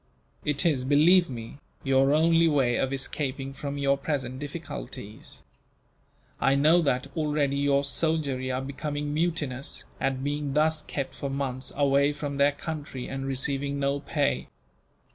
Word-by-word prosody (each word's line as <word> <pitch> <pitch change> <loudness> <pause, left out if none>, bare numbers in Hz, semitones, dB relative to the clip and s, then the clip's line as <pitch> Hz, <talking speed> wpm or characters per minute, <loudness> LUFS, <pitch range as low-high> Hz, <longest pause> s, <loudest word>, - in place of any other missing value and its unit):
It 150 +2 +1
is, 145 -6 +2
believe 160 +6 +5
me, 115 +2 -7 0.2
your 135 0 +3
only 165 +2 +4
way 135 -6 +2
of 135 - 0
escaping 135 0 -2
from 140 0 -5
your 140 0 +2
present 130 -4 -2
difficulties. 125 - -7 1.0
I 135 - +3
know 155 +5 +5
that, 130 -4 +1
already, 150 -3 +1
your 140 0 +2
soldiery 140 -3 0
are 130 +1 -1
becoming 145 +1 -3
mutinous 150 -5 -1
at 135 -1 -1
being 145 0 -2
thus 155 +1 +3
kept, 140 -2 -4
for 140 - -4
months, 135 -1 -3
away 140 0 +3
from 145 -1 -4
their 140 +1 +5
country, 145 -4 -6
and 135 0 -4
receiving 140 +1 -1
no 140 0 0
pay. 145 -1 -1
140 Hz, 145 wpm, -27 LUFS, 135-150 Hz, 1.0 s, believe